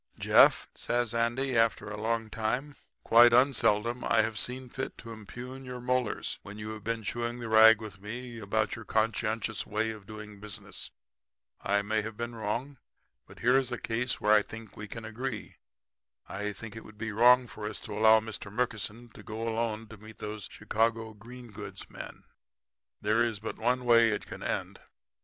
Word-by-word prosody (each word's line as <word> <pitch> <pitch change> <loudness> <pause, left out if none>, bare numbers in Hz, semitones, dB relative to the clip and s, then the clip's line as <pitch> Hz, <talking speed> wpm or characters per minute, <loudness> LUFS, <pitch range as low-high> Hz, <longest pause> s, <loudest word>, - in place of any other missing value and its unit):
"'Jeff,' - - +5
says 120 -1 0
Andy 120 +3 0
after 115 -1 +2
a - - -4
long 115 0 0
time, 125 +7 -2 0.3
'quite 120 +1 +7
unseldom 120 -2 +3
I 110 - +4
have 110 0 -2
seen 130 +1 -3
fit 130 +2 -5
to 115 - -9
impugn 125 +5 -9
your 125 -1 -6
molars 125 -2 -1
when 100 +1 -10
you 105 0 -5
have 110 -1 -8
been 115 0 -2
chewing 120 +2 -3
the 120 -1 -5
rag 110 0 +8
with 105 -4 -9
me 120 +3 -6
about 110 +1 0
your 115 - -8
conscientious 110 0 0
way 110 +1 0
of 105 -3 -11
doing 105 -1 -9
business. 105 -1 -7 0.7
I 100 0 +1
may 110 +1 0
have 110 0 -7
been 120 0 -3
often 115 - -9
wrong. 125 +7 -2 0.5
But - - -14
here 125 +2 +4
is 130 -2 -3
a 125 - -2
case 125 +3 -1
where 105 +1 +4
I 105 - +7
think 110 0 -10
we 105 - -7
can 115 +2 -7
agree. 115 0 -5 0.7
I 105 +1 -3
feel 115 +3 -8
that 115 - -10
it 115 - -8
would 110 - -14
be 110 0 -3
wrong 125 +4 +6
for 105 -2 -7
us 105 - -4
to - - -7
allow 110 +1 +6
Mr. 110 -2 -7
Murkison 115 0 -2
to - - -13
go 110 0 -5
alone 115 -1 -1
to 110 - -10
meet 110 +1 -13
those 105 -1 -6
Chicago 110 +1 0
green 120 +2 -12
goods 100 -2 -8
men. - - -9 0.8
There 110 +3 +2
is 115 -4 -1
but 110 - -5
one 125 +2 +1
way 115 -1 +6
it 105 - -2
can - - -9
end. - - -3
115 Hz, 195 wpm, -30 LUFS, 105-120 Hz, 0.8 s, rag